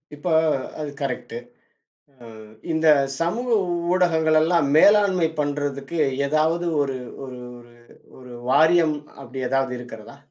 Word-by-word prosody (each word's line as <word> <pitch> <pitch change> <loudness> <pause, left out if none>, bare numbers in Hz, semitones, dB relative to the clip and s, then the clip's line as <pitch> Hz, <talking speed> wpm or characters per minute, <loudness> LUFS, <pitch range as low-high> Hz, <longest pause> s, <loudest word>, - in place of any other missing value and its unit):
இப்ப 145 +4 -8 0.5
அது 150 -1 -4
கரெக்ட் 125 -3 -4 0.9
ம். 110 -1 -13 0.2
இந்தச் 155 -4 +3
சமூக 225 +10 -2 0.4
ஊடகங்கள் 160 -4 +2
எல்லாம் 165 -2 +2
மேலாண்மை 195 -2 +4
பண்றதுக்கு 145 +1 -3 0.3
ஏதாவது 160 +4 0 0.2
ஒரு 135 -2 -3 0.3
ஒரு 125 -1 -9 0.8
ஒரு 125 -1 -13 0.2
வாரியம் 160 +2 +4 0.3
அப்டி 130 0 -9
ஏதாவது 135 -1 0
இருக்கிறதா? 120 +1 -11
150 Hz, 105 wpm, -22 LUFS, 135-165 Hz, 0.9 s, மேலாண்மை